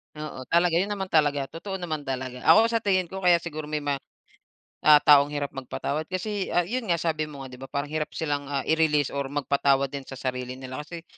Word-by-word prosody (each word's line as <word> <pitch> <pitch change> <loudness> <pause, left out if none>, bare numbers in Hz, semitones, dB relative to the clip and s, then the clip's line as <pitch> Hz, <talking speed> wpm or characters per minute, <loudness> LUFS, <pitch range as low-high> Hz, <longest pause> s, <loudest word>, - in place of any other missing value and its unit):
Oo, 150 -4 -7
talaga 170 0 +4
yun 195 +4 +1
naman 195 -2 -3
talaga 145 -4 +2
totoo 190 +5 -6
naman 155 -4 -4
talaga. 130 -2 -5
Ako 225 +1 +7
sa 230 -1 -1
tingin 185 -3 +2
ko 190 +1 -7
kaya 175 -1 +5
siguro 155 -2 -6
may 150 0 -3
mga, 145 -1 -1 0.9
ah, 150 -1 +8
taong 145 -1 +7
hirap 145 -1 -3
magpatawad 140 +3 -4
kasi, 190 +2 -3
ah, 175 0 +2
yun 235 +2 -3
nga 170 - +3
sabi 155 -2 -1
mo 140 -2 -9
nga 130 - -11
'di 125 - -11
ba 135 - -8
parang 140 +2 -4
hirap 155 -1 -1
silang, 145 -3 -2
ah, 140 -2 -2
i-release 155 -3 +2
or 140 -1 -2
magpatawad 140 -1 +1
din 140 -2 -6
sa 135 - -7
sarili 125 0 -4
nila 130 +2 -7
kasi 165 +2 -8
150 Hz, 220 wpm, -26 LUFS, 140-170 Hz, 0.9 s, ah